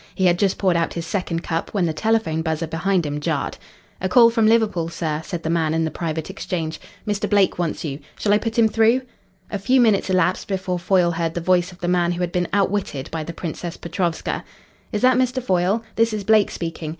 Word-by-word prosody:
He 190 - +1
had 175 -1 +3
just 195 -2 +2
poured 185 -3 +2
out 170 -1 0
his 170 -1 -3
second 170 -2 -2
cup, 165 +5 -3
when 190 -3 +2
the 160 - -1
telephone 215 -3 0
buzzer 160 0 -1
behind 170 +2 0
him 145 0 -3
jarred. 150 -2 -2 0.4
"A 190 - -1
call 230 +3 +7
from 225 -2 +3
Liverpool, 215 -7 +2
sir," 155 -2 -3
said 170 0 -5
the 160 - -2
man 160 -2 +1
in 165 0 +1
the 160 - -2
private 160 -2 -3
exchange. 170 -4 -4 0.3
"Mr. 210 0 -1
Blake 200 -3 +3
wants 170 -1 -2
you. 140 -1 -4 0.2
Shall 205 - +1
I 210 - +4
put 225 +1 -4
him 230 -1 +6
through?" 225 +4 +3 0.5
A 205 - -2
few 255 +7 +3
minutes 215 -5 +3
elapsed 185 0 +1
before 185 -2 -2
Foyle 175 0 +2
heard 165 -1 -2
the - - 0
voice 180 +1 +2
of 180 - -16
the 175 - -2
man 175 -1 +2
who 175 - -4
had 175 -1 -1
been 175 -1 0
outwitted 195 -8 -1
by 160 -1 -3
the 170 - -6
Princess 170 0 -6
Petrovska. 170 -1 -2 0.5
"Is 210 -1 -2
that 255 -1 +5
Mr. 255 0 +1
Foyle? 195 -1 +1
This 230 0 +3
is 210 -2 -3
Blake 215 0 +4
speaking. 165 -2 -5
180 Hz, 225 wpm, -22 LUFS, 165-205 Hz, 0.5 s, call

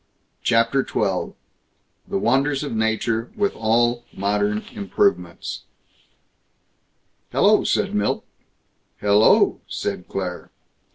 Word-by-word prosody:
CHAPTER 115 +3 +2
XII - - -1 0.7
THE - - -1
WONDERS 135 +6 +1
OF 140 -6 -4
NATURE 110 +1 0
WITH 205 -2 0
ALL 120 +2 +1
MODERN 105 +2 0
IMPROVEMENTS 395 - -1 1.7
"Hello!" 210 +1 +4
said 200 0 0
Milt. 210 - 0 0.7
"Hel 100 0 +3
lo!" 110 - +4
said 95 -3 -4
Claire. 90 -2 -5
115 Hz, 95 wpm, -22 LUFS, 105-140 Hz, 1.7 s, Hello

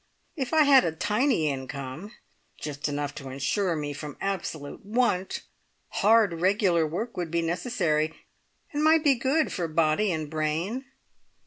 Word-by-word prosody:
If 265 -6 -3
I 315 -1 +5
had 275 -3 +7
a 165 - 0
tiny 210 - +1
income, 140 - -5 0.5
just 145 -1 -4
enough 145 0 -3
to 135 -2 -8
ensure 165 +8 0
me 145 -1 -3
from 145 0 -7
absolute 170 -5 -4
want, 205 -3 0 0.5
hard 205 -5 +3
regular 185 -4 +3
work 215 +10 -4
would 175 -2 -2
be 170 +1 0
necessary, 165 -4 0 0.6
and 295 +1 0
might 315 0 +5
be 290 -3 +5
good 270 +5 +1
for 175 -3 -2
body 160 +5 +2
and 155 -2 -2
brain. 160 - -2
170 Hz, 145 wpm, -27 LUFS, 155-225 Hz, 0.6 s, had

